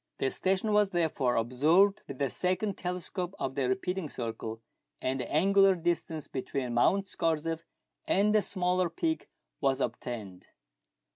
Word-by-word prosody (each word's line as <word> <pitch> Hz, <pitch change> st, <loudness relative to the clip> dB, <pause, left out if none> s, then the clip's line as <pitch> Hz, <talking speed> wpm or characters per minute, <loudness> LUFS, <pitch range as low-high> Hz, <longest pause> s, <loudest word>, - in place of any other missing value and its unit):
The 135 Hz, -, 0 dB
station 195 Hz, +3 st, +1 dB
was 210 Hz, -1 st, +4 dB
therefore 160 Hz, -8 st, +1 dB
observed 155 Hz, -, +3 dB
with 140 Hz, -, -7 dB
the 135 Hz, -2 st, 0 dB
second 185 Hz, +2 st, -1 dB
telescope 180 Hz, +1 st, -4 dB
of 135 Hz, -, -2 dB
the 135 Hz, -2 st, 0 dB
repeating 180 Hz, +2 st, -1 dB
circle, 115 Hz, -2 st, -5 dB, 0.4 s
and 130 Hz, +1 st, -1 dB
the 125 Hz, -, -4 dB
angular 195 Hz, +4 st, +5 dB
distance 165 Hz, -2 st, -2 dB
between 130 Hz, -1 st, -3 dB
]\Iount 195 Hz, +11 st, +3 dB
Scorzef 165 Hz, -1 st, -1 dB, 0.5 s
and 205 Hz, +2 st, +3 dB
the 215 Hz, -, +5 dB
smaller 180 Hz, -2 st, 0 dB
peak 320 Hz, -, -2 dB, 0.3 s
was 135 Hz, -1 st, +1 dB
obtained. 110 Hz, -6 st, -4 dB
165 Hz, 140 wpm, -30 LUFS, 130-190 Hz, 0.5 s, angular